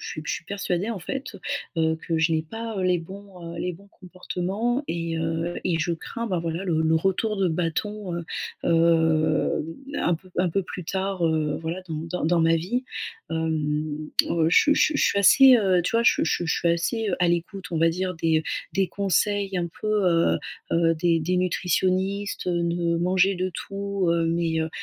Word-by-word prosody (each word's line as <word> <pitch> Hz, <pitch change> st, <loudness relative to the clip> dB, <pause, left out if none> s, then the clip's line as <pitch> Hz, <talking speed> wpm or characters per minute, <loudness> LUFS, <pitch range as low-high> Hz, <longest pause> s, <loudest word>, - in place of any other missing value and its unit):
je -, -, -7 dB
suis 155 Hz, -, -6 dB
je -, -, -2 dB
suis -, -, -5 dB
persuadée, 195 Hz, +1 st, -2 dB
en 210 Hz, -, -3 dB
fait, 260 Hz, +4 st, -5 dB, 0.4 s
heu, 160 Hz, 0 st, +2 dB
que 165 Hz, -1 st, 0 dB
je 160 Hz, +1 st, +2 dB
n'ai 155 Hz, -, +1 dB
pas, 225 Hz, +6 st, -6 dB
heu, -, -, -1 dB
les 180 Hz, -1 st, +2 dB
bons, 180 Hz, -1 st, -10 dB
heu, -, -, -7 dB
les 180 Hz, +1 st, -2 dB
bons 200 Hz, +4 st, -15 dB
comportements. 190 Hz, +7 st, -3 dB
Et 165 Hz, -1 st, -2 dB
heu 165 Hz, +1 st, -2 dB
et 170 Hz, -3 st, +1 dB
je 165 Hz, +2 st, 0 dB
crains, 230 Hz, +7 st, -5 dB
bah, 185 Hz, -5 st, -1 dB
voilà, 165 Hz, +3 st, -3 dB
le 160 Hz, -3 st, +1 dB
le 160 Hz, 0 st, +3 dB
retour 195 Hz, +5 st, 0 dB
de 190 Hz, -2 st, +2 dB
bâton, 180 Hz, +4 st, -2 dB
heu, 170 Hz, -, -4 dB, 0.4 s
hem, 160 Hz, -2 st, +2 dB, 0.3 s
un 175 Hz, -, +2 dB
peu 185 Hz, +3 st, -12 dB
un 180 Hz, 0 st, +3 dB
peu 195 Hz, -, 0 dB
plus 180 Hz, -1 st, -7 dB
tard, 190 Hz, 0 st, -2 dB
heu, 155 Hz, -2 st, 0 dB
voilà, 170 Hz, +3 st, -4 dB
dans 160 Hz, -, -4 dB
dans 165 Hz, 0 st, -3 dB
dans 170 Hz, +1 st, +3 dB
ma 165 Hz, 0 st, +4 dB
vie. 225 Hz, +11 st, -2 dB, 0.5 s
Hem, 155 Hz, -1 st, -2 dB, 0.2 s
heu, 165 Hz, -2 st, +2 dB
je -, -, +7 dB
suis 295 Hz, -, +4 dB
je -, -, +1 dB
suis 305 Hz, -, +2 dB
je -, -, +2 dB
suis 200 Hz, -, +3 dB
assez, 260 Hz, +6 st, +8 dB
heu, 190 Hz, -5 st, +3 dB
tu 180 Hz, -, -2 dB
vois? 230 Hz, 0 st, +3 dB
Je -, -, +6 dB
suis -, -, 0 dB
je 160 Hz, -, +1 dB
suis 175 Hz, -, -2 dB
je -, -, +1 dB
suis, 170 Hz, -, +1 dB
heu, -, -, +4 dB
assez 215 Hz, +6 st, -1 dB
à 175 Hz, -, +4 dB
l'écoute, 175 Hz, +3 st, -2 dB
on 165 Hz, -, -1 dB
va 165 Hz, +1 st, +4 dB
dire, 185 Hz, +2 st, -2 dB
des 160 Hz, -1 st, +2 dB, 0.3 s
des 195 Hz, -1 st, +1 dB
conseils 200 Hz, 0 st, 0 dB
un 175 Hz, -1 st, -1 dB
peu, -, -, -4 dB, 0.5 s
heu -, -, 0 dB, 0.3 s
heu, 165 Hz, 0 st, +3 dB
des 165 Hz, 0 st, +2 dB
des 180 Hz, +4 st, 0 dB
nutritionnistes, 185 Hz, +3 st, 0 dB
heu, 175 Hz, -1 st, +1 dB
de 170 Hz, 0 st, 0 dB
manger 185 Hz, +3 st, +2 dB
de 185 Hz, +1 st, -2 dB
tout, 200 Hz, 0 st, -3 dB
heu, 170 Hz, -1 st, +2 dB
mais 165 Hz, -1 st, 0 dB
heu, 160 Hz, -, -1 dB
175 Hz, 215 wpm, -25 LUFS, 165-195 Hz, 0.5 s, assez